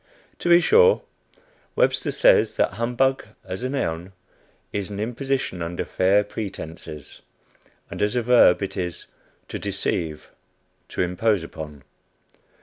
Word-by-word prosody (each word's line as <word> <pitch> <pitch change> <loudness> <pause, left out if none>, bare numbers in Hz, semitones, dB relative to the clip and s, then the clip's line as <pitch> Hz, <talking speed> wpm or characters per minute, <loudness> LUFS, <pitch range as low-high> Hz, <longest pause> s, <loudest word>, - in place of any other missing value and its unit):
To 175 - -2
be 170 0 +8
sure, 470 - +5 0.7
Webster - - +2
says - - +4
that - - +1
humbug, 125 +3 0 0.2
as 95 +3 -5
a 130 - -2
noun, 90 -9 -3 0.6
is 100 -1 -3
an 100 -1 -6
"imposition 125 -3 -2
under 85 +1 -3
fair 100 +3 +3
pretences;" 85 -8 -8 0.7
and - - -7
as 105 +3 +1
a 120 - +1
verb, 115 -6 +5
it 95 0 -4
is 90 -3 -4 0.4
"to - - -5
deceive; 80 -3 -3 0.6
to - - -3
impose 90 +1 0
on." 75 -3 -8
100 Hz, 130 wpm, -23 LUFS, 90-125 Hz, 0.7 s, be